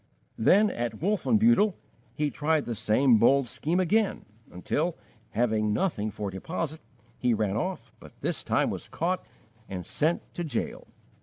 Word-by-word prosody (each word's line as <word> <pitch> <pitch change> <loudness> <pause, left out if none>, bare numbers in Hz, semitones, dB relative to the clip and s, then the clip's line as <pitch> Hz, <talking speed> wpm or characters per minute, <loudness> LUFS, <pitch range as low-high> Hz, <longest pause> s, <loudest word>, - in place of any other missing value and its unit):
Then, 200 - +5
at 115 -2 -3
Wolfenbuttel, 210 +2 +3 0.4
he 150 -1 0
tried 150 +3 +1
the 120 - -3
same 115 +2 +3
bold 135 +3 +4
scheme 165 +9 -1
again, 200 +3 +1 0.3
until, 155 - -1 0.3
having 110 -2 +1
nothing 110 - 0
for 105 -1 -5
deposit, 160 - -4 0.4
he 125 -2 +2
ran 105 -2 0
off, 180 - -3
but - - -15
this - - -2
time - - +1
was - - -6
caught 180 +3 -1 0.5
and 90 -3 -5
sent 160 - 0
to 175 - -3
jail. 155 - -4
145 Hz, 145 wpm, -28 LUFS, 110-180 Hz, 0.5 s, Then